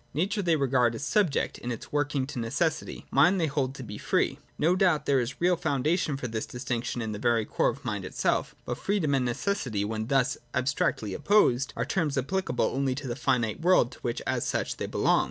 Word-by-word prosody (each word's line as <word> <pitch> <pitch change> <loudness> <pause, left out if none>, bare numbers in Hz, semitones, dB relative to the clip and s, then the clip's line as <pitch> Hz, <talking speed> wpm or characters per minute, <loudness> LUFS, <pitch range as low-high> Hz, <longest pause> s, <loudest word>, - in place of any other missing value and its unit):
Nature 200 +7 0
they 170 -4 +2
regard 125 -5 +2
as 125 - -5
subject 180 -2 +1
in 120 - -4
its 115 - -7
workings 145 -2 -1
to - - -4
necessity; 135 +8 -2
Mind 185 +2 +5
they 165 - +2
hold 135 -3 -1
to 130 - -7
be 105 -3 -7
free. - - 0 0.2
No 170 +4 +3
doubt 175 -6 +2
there 140 -2 +3
is 125 +2 -2
a - - -22
real 180 +1 +3
foundation 150 0 0
for 130 - -4
this 110 -1 -3
distinction 125 -1 -3
in 110 - -3
the 105 - -5
very 115 -2 +2
core - - +1
of - - -6
the - - -19
Mind - - -2
itself: - - -1
but - - -4
freedom 190 -8 0
and 130 -2 +2
necessity, 120 - -1
when 110 +1 -3
thus 135 -1 +1 0.2
abstractly 125 -5 0
opposed, 135 - +3
are 115 - -1
terms 150 -2 0
applicable 185 +9 0
only 135 -1 0
in 140 - -7
the 120 - -2
finite 125 -5 0
world 170 -8 +4
to - - -13
which, 120 -1 -3
as - - 0
such, - - -2
they - - -3
belong. - - +2
135 Hz, 220 wpm, -28 LUFS, 120-160 Hz, 0.2 s, Mind